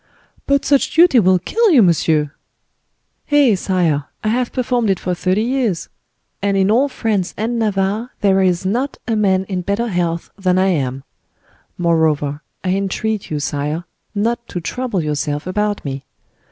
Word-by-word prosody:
"But 280 0 +2
such 280 -2 +2
duty 330 -6 +6
will 185 -2 +4
kill 445 - +1
you, 275 - +6
monsieur." 160 -4 +2 1.0
"Eh! 290 -6 +5
sire, 175 -6 0 0.2
I 215 - +1
have 245 +2 0
performed 245 -3 0
it 190 - +1
for 180 - -2
thirty 185 +4 0
years, 240 -8 -1 0.5
and 200 0 +1
in 195 +1 +3
all 265 +6 +3
France 210 -8 -2
and 230 +2 -1
Navarre 210 +2 0
there 195 -1 +3
is 180 -1 +1
not 245 +8 -1
a 225 - +1
man 190 -3 +2
in 185 -2 -3
better 200 +6 -1
health 170 -3 -2
than 185 -1 +2
I 190 +1 +3
am. 135 -6 -1 0.7
Moreover, 155 -4 +1 0.2
I 185 - -1
entreat 200 +2 -2
you, 150 - -2
sire, 150 +3 -2 0.3
not 235 +3 -1
to 180 - -4
trouble 205 +1 -3
yourself 150 0 -2
about 205 +1 -1
me. 135 -1 -4
195 Hz, 160 wpm, -18 LUFS, 170-230 Hz, 1.0 s, duty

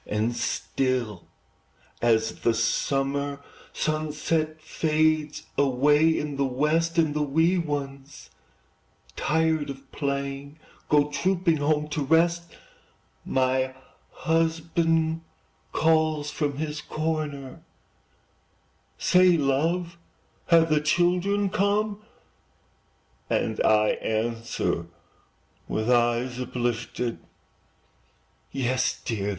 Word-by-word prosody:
And 110 +3 -1
still, 120 -4 -2 0.7
as 115 -1 +2
the 115 - +2
summer 140 +4 0 0.3
sunset 155 +1 -1
Fades 155 -1 0 0.2
away 145 +4 +4
in 145 -2 -3
the 140 - +1
west, 155 +6 0
And 160 -3 +3
the 150 - -1
wee 160 +5 +2
ones, 140 -3 -5 0.8
tired 160 -1 +1
of 135 -1 -9
playing, 140 0 -3 0.3
Go 150 0 +3
trooping 175 0 +1
home 150 +1 +1
to 150 -1 -2
rest, 170 +3 +2 0.7
My 130 0 0 0.3
husband 165 0 0 0.5
calls 155 -2 +2
from 145 -3 -2
his 150 0 -3
corner, 155 -4 -4 1.4
"Say, 180 -1 +5
love, 165 +5 0 0.5
have 165 -2 +5
the 150 -1 +3
children 180 +5 +2
come?" 205 +2 0 1.3
And - - 0
I 110 0 +4
answer, 115 -6 -2 0.8
with 110 +3 -1
eyes 120 +1 +2
uplifted, 120 -1 -2 1.3
"Yes, 130 -1 0
dear! 105 -3 -2
150 Hz, 90 wpm, -26 LUFS, 130-160 Hz, 1.4 s, Say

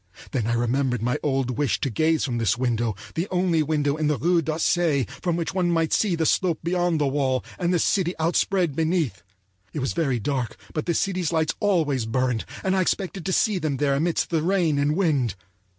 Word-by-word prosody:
Then 120 -5 -1
I 120 - +1
remembered 125 0 0
my 125 +1 0
old 135 -3 -1
wish 145 -6 +1
to 135 - -1
gaze 160 +6 +1
from 120 -4 -2
this 115 0 +1
window, 120 -3 0 0.2
the 170 +4 -2
only 180 -3 +1
window 150 -1 0
in 155 -1 0
the 150 -1 +1
Rue 175 +1 +2
d'Auseil 160 -2 +1 0.2
from 175 -2 0
which 170 +2 -2
one 180 -2 +1
might 165 -1 +1
see 200 -5 +2
the 165 -1 0
slope 170 0 +2
beyond 175 -1 +1
the 145 - +2
wall, 135 -2 0
and 175 -1 +1
the 180 - +3
city 180 +1 +1
outspread 170 0 +1
beneath. 160 - 0 0.5
It - - -3
was 135 - -1
very 145 -7 0
dark, 120 0 -2 0.2
but 155 - -3
the 170 - +1
city's 180 -3 0
lights 160 -2 +1
always 155 - +1
burned, 125 -1 0 0.2
and 190 0 +1
I 190 - +3
expected 190 0 -2
to - - 0
see 205 0 +2
them 150 -5 -1
there 140 0 +1
amidst 165 +6 0
the 165 -2 +1
rain 170 -4 +1
and 145 +2 +1
wind. 145 - +1
155 Hz, 210 wpm, -24 LUFS, 135-175 Hz, 0.5 s, the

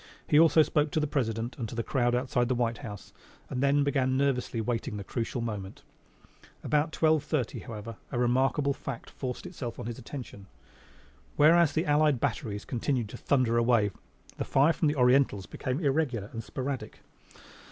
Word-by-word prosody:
He 150 - +4
also 160 -1 +6
spoke 150 0 +1
to - - +2
the 150 - +1
President 120 -5 -2
and 115 -3 -3
to - - -7
the 115 - -1
crowd 120 -2 +1
outside 125 -1 0
the 130 - 0
White 120 -1 -1
House, 105 -8 -9 0.4
and 125 - -2
then 140 +1 +3
began 130 -2 +1
nervously 130 -4 0
waiting 115 0 -2
the 100 - -5
crucial 115 +3 -3
moment. 105 -4 -5 0.8
About 150 +1 +1
twelve 155 -2 +2
thirty, 150 -6 -2
however, 110 0 -8
a 125 - -2
remarkable 130 +3 +2
fact 135 -3 -7
forced 125 +3 -5
itself 145 -10 -6
on 120 - -5
his 120 -1 -5
attention. 115 -6 -9 0.9
Whereas 160 0 +5
the 160 - 0
allied 150 -2 +3
batteries 110 -6 -2
continued 120 -2 -1
to - - -8
thunder 125 -4 +2
away, 115 -4 +3 0.5
the - - -1
fire 145 +5 +3
from 160 - +1
the 150 - +1
Orientals 125 -6 +3
became 130 +2 -3
irregular 135 - 0
and 115 -1 -5
sporadic. 130 +3 -5
130 Hz, 175 wpm, -29 LUFS, 115-145 Hz, 0.9 s, also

